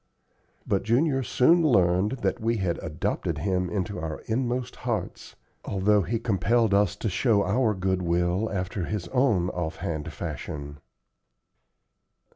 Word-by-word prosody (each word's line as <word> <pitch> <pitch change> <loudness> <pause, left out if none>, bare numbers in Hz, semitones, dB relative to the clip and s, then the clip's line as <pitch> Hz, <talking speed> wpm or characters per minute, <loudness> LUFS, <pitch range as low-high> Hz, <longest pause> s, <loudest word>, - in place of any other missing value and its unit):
But 100 - +1
Junior 135 +5 +2
soon 160 +7 +4
learned 95 - +3
that 125 - 0
we 115 +1 +1
had 95 -4 -1
adopted 75 0 -2
him 90 -2 0
into 100 +1 -3
our 80 0 -5
inmost 125 +1 -2
hearts, 115 -7 -4 0.3
although 100 +1 +2
he 115 +5 -1
compelled 110 0 +1
us 100 -3 +3
to - - -3
show 105 +1 +2
our 110 +2 +2
good 95 0 0
will 90 +4 0
after 90 -1 -2
his 105 -2 -3
own 120 -10 +2
off 80 -3 -3
hand 80 -2 -4
fashion. 70 0 -6
100 Hz, 135 wpm, -26 LUFS, 90-115 Hz, 0.3 s, soon